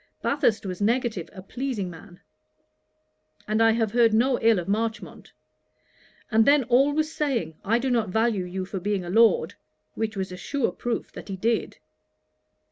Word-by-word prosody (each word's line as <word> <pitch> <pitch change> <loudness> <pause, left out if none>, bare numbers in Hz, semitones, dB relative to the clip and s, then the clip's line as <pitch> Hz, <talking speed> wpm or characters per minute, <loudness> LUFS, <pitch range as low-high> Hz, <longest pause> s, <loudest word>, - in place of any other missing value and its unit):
Bathurst 230 -7 +1
was 185 0 -5
negative, 225 -4 0
a 185 -2 -11
pleasing 240 -2 -4
man; 175 +1 -12 1.3
and 215 +1 +1
I 225 - +6
have 225 -2 0
heard 230 -2 +4
no 250 +3 +2
ill 225 -1 +4
of 175 - -4
Marchmont; 220 +2 -3 1.0
and 220 +1 +5
then 285 +2 +4
always 285 +6 +2
saying, 230 - -2
"I 225 +4 +2
do 260 +2 -1
not 230 -5 +1
value 220 -2 +1
you 185 +1 -4
for 190 0 -5
being 195 -1 -2
a 175 - -5
Lord;" 230 - +4 0.4
which 220 -1 -3
was 190 -1 -3
a 180 - -7
sure 280 +5 -1
proof 240 -1 -4
that - - -10
he 195 - -3
did. 225 +4 -1
225 Hz, 165 wpm, -25 LUFS, 195-240 Hz, 1.3 s, I